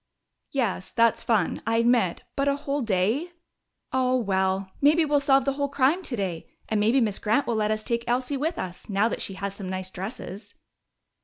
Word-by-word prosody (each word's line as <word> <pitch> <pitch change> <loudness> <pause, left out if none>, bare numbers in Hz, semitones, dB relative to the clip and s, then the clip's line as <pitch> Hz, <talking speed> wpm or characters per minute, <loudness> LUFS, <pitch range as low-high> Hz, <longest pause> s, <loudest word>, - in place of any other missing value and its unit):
"Yes, 225 -9 -2
that's 230 -1 +3
fun, 215 -7 +1
I 225 0 +2
admit. 230 -6 +2
But 275 0 0
a 280 - +3
whole 285 0 -2
day 225 - 0 0.3
" - - -35
"Oh, 255 -1 +2
well, 190 -3 0
maybe 310 +3 +5
we'll 295 -1 +3
solve 275 -2 +3
the 275 - +1
whole 280 0 -1
crime 280 +6 +2
today! 195 - -3 0.2
And 215 - 0
maybe 225 +6 +3
Miss 215 -5 0
Grant 225 +6 +1
will 235 - -1
let 215 -1 +1
us 215 0 -1
take 235 +1 -1
Elsie 250 +3 0
with 315 +5 -1
us, 180 +2 -6
now 200 +2 +2
that - - -4
she 195 - -3
has 200 0 -4
some 195 -2 -7
nice 185 0 -4
dresses." 200 +1 -7
230 Hz, 200 wpm, -26 LUFS, 195-275 Hz, 0.3 s, maybe